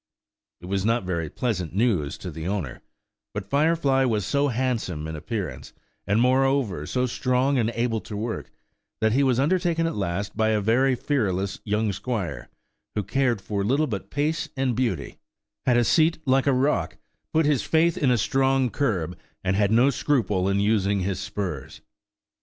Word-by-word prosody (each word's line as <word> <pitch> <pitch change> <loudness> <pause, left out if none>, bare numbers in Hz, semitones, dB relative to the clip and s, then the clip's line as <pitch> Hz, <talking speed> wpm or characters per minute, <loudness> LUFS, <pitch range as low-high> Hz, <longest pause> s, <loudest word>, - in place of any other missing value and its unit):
It - - -10
was 95 +1 -1
not 115 +1 +1
very 85 -4 -2
pleasant 90 -8 -2
news 100 - +1
to 90 - -7
the 80 +2 -6
owner, 95 -10 -3 0.5
but 100 -1 -5
Firefly 140 -2 +3
was 110 -5 0
so 145 0 +1
handsome 115 - -2
in 80 - -5
appearance, 80 - -5 0.3
and 105 +2 +2
moreover, 130 - +2
so 125 0 0
strong 130 +2 +1
and 115 -1 +1
able 115 -1 0
to 105 - -7
work, 110 +2 -4 0.5
that 110 0 +2
he 130 +5 +3
was 130 -3 +2
undertaken 165 +2 +1
at 165 - -1
last 100 0 -3
by 110 0 +2
a 110 -1 +2
very 125 +6 +3
fearless 100 -9 -1
young 105 0 0
squire, 95 - -4 0.5
who 105 - 0
cared 125 -1 0
for 100 0 -2
little 135 +9 +2
but 100 -6 -5
pace 150 +3 -1
and 130 -3 +1
beauty, 115 -7 -2 0.5
had 125 -1 +4
a 120 - +4
seat 160 +7 +3
like 135 +1 +2
a - - +5
rock, 135 +3 +1 0.3
put 160 0 +3
his 145 -4 +2
faith 165 +1 +2
in 140 - +1
a 125 - +4
strong 135 +2 +2
curb, 90 - -1 0.3
and 95 0 +1
had 100 0 +2
no 120 +5 +5
scruple 105 -10 +1
in 100 0 +1
using 100 -1 +2
his 95 0 -2
spurs. 95 -9 -5
115 Hz, 175 wpm, -25 LUFS, 100-135 Hz, 0.5 s, a